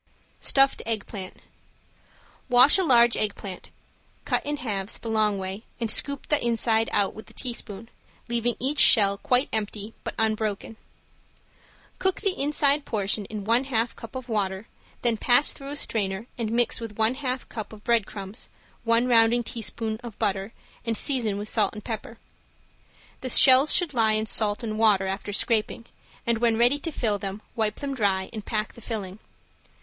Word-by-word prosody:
~STUFFED 270 0 +3
EGG 220 -3 -2
PLANT~ 190 -4 -8 1.1
Wash 250 +8 +7
a - - +2
large 240 -6 +5
egg 210 -1 0
plant, 190 -3 -8 0.6
cut - - 0
in 295 0 -3
halves 205 -6 -3
the 230 - -6
long 215 -2 +2
way 190 +2 -5 0.2
and 230 -2 0
scoop 280 +3 -1
the 295 - +2
inside 225 -1 +1
out 200 -1 +1
with 220 - -11
a - - -14
teaspoon, 230 -4 -5 0.4
leaving 235 0 -1
each 285 +3 -1
shell 200 -4 +7
quite 250 +2 +2
empty, 215 0 -3
but - - -5
unbroken. 220 -1 -1 1.2
Cook 375 -1 0
the 400 -2 +2
inside 290 0 +2
portion 205 -2 -1
in 210 0 -6
one 230 +5 +2
half 235 -3 -1
cup 230 - -11
of 260 -1 -6
water, 200 -3 -2 0.4
then 235 -2 +2
press 245 +6 +4
through 275 -1 -9
a 290 - -5
strainer 200 -6 -2
and 225 -2 -3
mix 240 0 +1
with 225 -3 -8
one 220 +2 +3
half 260 -2 -4
cup 215 -3 -7
of 215 -1 -13
bread 235 -4 +2
crumbs, 200 +2 -7 0.3
one 230 +1 +2
rounding 235 0 +4
tablespoon 225 -1 -4
of 235 -4 -9
butter 200 -1 -1 0.3
and 230 -2 -1
season 230 -8 +1
with 205 +1 -5
salt 215 -1 0
and 210 - -8
pepper. 225 0 -6 1.0
The 255 - -4
shells 265 +3 +7
should 345 -5 +2
lie 225 -3 +3
in 215 0 0
salt 215 0 0
and 215 -1 -4
water 210 -4 +4
after 195 +2 -4
scraping, 220 +2 -1 0.4
and 235 -1 +1
when 230 -1 +2
ready 245 +5 +3
to 330 - -5
fill 215 -7 -1
them 195 +2 -6
wipe 220 -2 0
them 280 -1 -3
dry 195 -6 0
and 215 -2 -6
pack 215 0 -2
the 235 - -14
filling. 210 -4 -5
225 Hz, 175 wpm, -25 LUFS, 210-245 Hz, 1.2 s, Wash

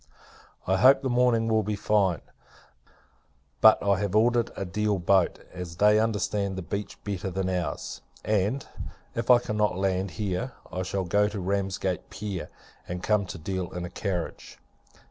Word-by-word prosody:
I 95 +1 +2
hope 135 +5 +6
the 130 - 0
morning 120 -2 +3
will 110 -1 +3
be 105 0 -2
fine: 100 -4 +1 1.4
but 110 - +7
I 100 -1 +2
have 100 -1 -2
ordered 120 +2 +3
a 95 - -3
Deal 105 +3 0
boat, 95 0 +2 0.2
as 90 -2 -7
they 105 +3 +5
understand 105 -3 0
the 95 - -5
beach 100 +4 -5
better 100 -2 -3
than 95 +1 -2
our's; 90 -5 -3 0.2
and, 105 +6 0 0.5
if 115 +1 -3
I 125 - +9
cannot 105 -5 0
land 95 0 0
here, 105 +5 -2 0.2
I 90 - -3
shall 95 +1 -2
go 100 +4 +2
to 105 -1 -5
Ramsgate 95 -1 -2
Pier, 100 -2 -5 0.4
and 90 0 -5
come 105 -3 +2
to 90 - -6
Deal 90 +2 -4
in 90 0 -4
a 90 - -8
carriage. 90 -5 -4
100 Hz, 165 wpm, -27 LUFS, 95-105 Hz, 1.4 s, I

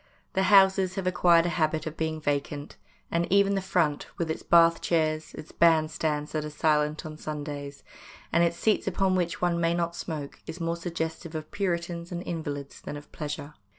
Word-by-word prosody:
The 190 - +2
houses 190 -2 +5
have 195 - -3
acquired 175 -2 +4
a - - +1
habit 155 -2 0
of 155 0 -5
being 160 -1 -2
vacant, 145 -1 -2 0.4
and 170 +1 0
even 200 0 +4
the 195 - 0
front, 170 -6 0
with 165 -2 -1
its - - -4
bath 165 0 +5
chairs, 155 -2 0
its 155 - -9
band 160 -2 +4
stands 150 -1 -2
that 155 -1 -2
are 150 - -4
silent 150 +1 +1
on 155 -1 -7
Sundays, 145 -2 -6 0.5
and 170 - +5
its 170 0 +1
seats 215 -2 +1
upon 190 0 +1
which 175 -1 -1
one 170 -1 +2
may 165 0 +2
not 170 0 -1
smoke, 150 -5 -6
is 165 - -6
more 165 0 -1
suggestive 165 -1 -4
of 155 -1 -6
Puritans 170 -3 -2
and 175 0 -4
invalids 145 -5 -5
than 145 - -6
of 145 - -13
pleasure. 150 -1 -5
165 Hz, 190 wpm, -27 LUFS, 155-175 Hz, 0.5 s, houses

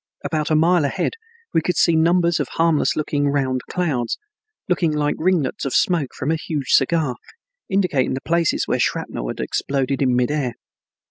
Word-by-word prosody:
About 155 -2 -1
a 155 - +3
mile 170 +1 +4
ahead 140 - -1 0.4
we - - +3
could 180 +3 -1
see 170 - +4
numbers 170 +1 +3
of 145 - -1
harmless 165 -2 +2
looking 145 -1 0
round 130 -2 0
clouds, 145 -10 -1 0.5
looking 175 -3 +1
like 150 -1 0
ringlets 165 -6 0
of 135 - -2
smoke 165 -7 +1
from 140 - -2
a 165 - +1
huge 145 -5 -3
cigar, 140 -2 +2 0.5
indicating 180 -11 +1
the 130 - -4
places 170 -1 +1
where - - 0
shrapnel - - -2
had - - -5
exploded 135 0 -1
in 130 -2 +2
mid 125 +2 +1
air. 135 -6 -1
150 Hz, 175 wpm, -21 LUFS, 135-170 Hz, 0.5 s, mile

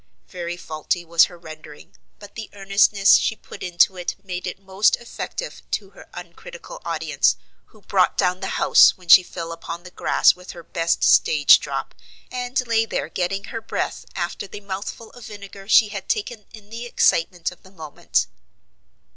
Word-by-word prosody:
Very 175 -1 -6
faulty 165 +1 -3
was 170 0 +5
her 175 - -13
rendering, 155 -3 -13 0.2
but 205 - -13
the 225 -2 -8
earnestness 200 0 +4
she 220 - -1
put - - -13
into 180 +1 +2
it 180 - -4
made 185 -1 -5
it 180 - -6
most 195 +1 +2
effective 240 - -7
to - - -3
her - - -16
uncritical - - -10
audience, - - +1 0.3
who 215 -3 -23
"brought 190 -2 +1
down 180 -1 +1
the - - -4
house," - - +6
when 180 -1 -18
she 185 - +9
fell 170 -2 -7
upon 165 +1 -7
the 180 - -12
grass - - +3
with 180 0 -11
her 170 - -11
best 165 0 -1
stage 145 -2 +6
drop, - - -5 0.4
and 250 +1 -2
lay 230 -1 +2
there - - -3
getting 195 +2 -2
her 230 +2 -6
breath - - -4
after 175 +3 -4
the 205 - -10
mouthful 200 +3 -7
of 245 -2 -13
vinegar 200 -2 -11
she 220 0 +5
had 205 -2 -7
taken 215 0 -3
in 210 -2 -15
the 235 +1 -6
excitement 175 -5 +1
of 180 - -16
the 190 - -17
moment. 160 -6 -2
190 Hz, 175 wpm, -22 LUFS, 175-215 Hz, 0.4 s, she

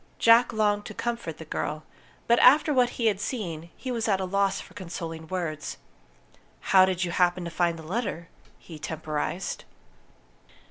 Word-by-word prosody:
Jack 230 +1 +6
longed 210 -1 +1
to 215 - -8
comfort 235 -10 -3
the 160 - -9
girl; 155 0 -3 0.4
but 235 0 +4
after 295 +4 +6
what 250 -2 +4
he 235 - -1
had 205 -3 +2
seen, 170 -9 -4
he 260 - -5
was 230 -2 -1
at 195 -3 +2
a 190 - -1
loss 195 +1 +1
for - - -12
consoling 165 -3 -7
words. 165 -4 -4 1.0
"How 190 -1 +8
did 185 -1 -1
you 175 - -2
happen 180 0 +1
to 170 - -5
find 170 0 0
the 160 - -10
letter?" 185 -1 -3 0.3
he 160 -3 -12
temporized. 155 +4 -3
185 Hz, 170 wpm, -27 LUFS, 165-220 Hz, 1.0 s, How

